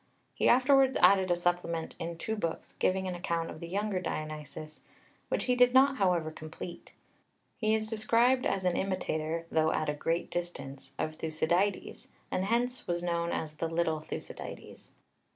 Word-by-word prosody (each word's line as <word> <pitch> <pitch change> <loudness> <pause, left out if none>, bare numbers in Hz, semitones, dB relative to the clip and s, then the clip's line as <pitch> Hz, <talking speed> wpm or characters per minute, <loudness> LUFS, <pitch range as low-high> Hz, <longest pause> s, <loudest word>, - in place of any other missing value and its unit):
He - - +2
afterwards 265 +1 +5
added 190 -2 +6
a 175 - +4
supplement 175 -2 -1
in 165 0 -4
two 220 +6 -2
books, 170 -6 -4
giving 190 0 +1
an 185 - -2
account 170 -2 -2
of - - -9
the 170 - -6
younger 200 +1 -1
Dionysius, 155 -1 -6 0.5
which - - 0
he 250 - +2
did 250 0 +5
not, 270 +1 +6
however, 175 -6 +1
complete. 155 +2 -9 0.6
He 220 -1 +2
is 220 0 0
described 235 +4 +3
as 190 -1 -1
an 180 -1 +2
imitator, 165 -4 -2
though 160 0 +3
at 155 - 0
a - - +1
great 165 +3 -2
distance, 140 -6 -5
of 155 - -2
Thucydides, 170 +5 -1 0.2
and 185 - 0
hence 245 +4 0
was 175 0 -1
known 170 -1 0
as 155 -1 -3
"the 165 - -1
little 165 -1 0
Thucydides." 155 - -8
175 Hz, 165 wpm, -30 LUFS, 160-215 Hz, 0.6 s, added